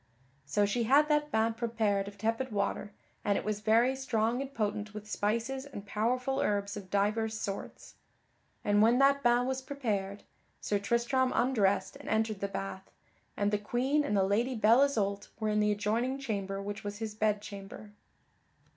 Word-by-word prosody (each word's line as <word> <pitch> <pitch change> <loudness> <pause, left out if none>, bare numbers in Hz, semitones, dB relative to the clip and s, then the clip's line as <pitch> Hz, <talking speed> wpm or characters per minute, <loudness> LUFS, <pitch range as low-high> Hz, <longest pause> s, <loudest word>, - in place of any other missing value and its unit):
So 205 +8 +2
she 225 +4 0
had 290 +5 +5
that 300 0 +2
bain 220 +1 +2
prepared 220 -4 0
of 200 0 -9
tepid 225 +5 -1
water, 205 0 -2 0.3
and 200 -1 +2
it - - -4
was 210 -1 -1
very 230 +5 +3
strong 245 -2 0
and 275 0 -5
potent 210 -3 -3
with 210 0 -7
spices 230 +6 -1
and 250 -8 -9
powerful 250 +6 0
herbs 200 -1 0
of 200 -3 -8
divers 215 +3 0
sorts. 195 -1 -6 0.7
And 205 0 +4
when 230 +3 +5
that 275 +1 +4
bain 240 -1 +3
was 265 0 -2
prepared, 210 -8 -3 0.4
Sir 205 - -1
Tristram 235 +5 +1
undressed 225 -6 +1
and - - -9
entered 220 -2 0
the 200 - -1
bath, 195 -1 -6 0.5
and 205 0 +1
the 210 - +1
Queen 260 +8 +1
and 210 -8 0
the 195 - +4
Lady 230 +7 +1
Belle 225 +3 +5
Isoult 205 -8 0
were 215 -1 0
in 210 0 +1
the 210 0 +3
adjoining 225 +6 0
chamber 200 -7 -3
which 205 +1 -5
was 205 0 -5
his 220 -1 -4
bed 215 -1 +1
chamber. 205 0 -9
215 Hz, 175 wpm, -31 LUFS, 205-245 Hz, 0.7 s, had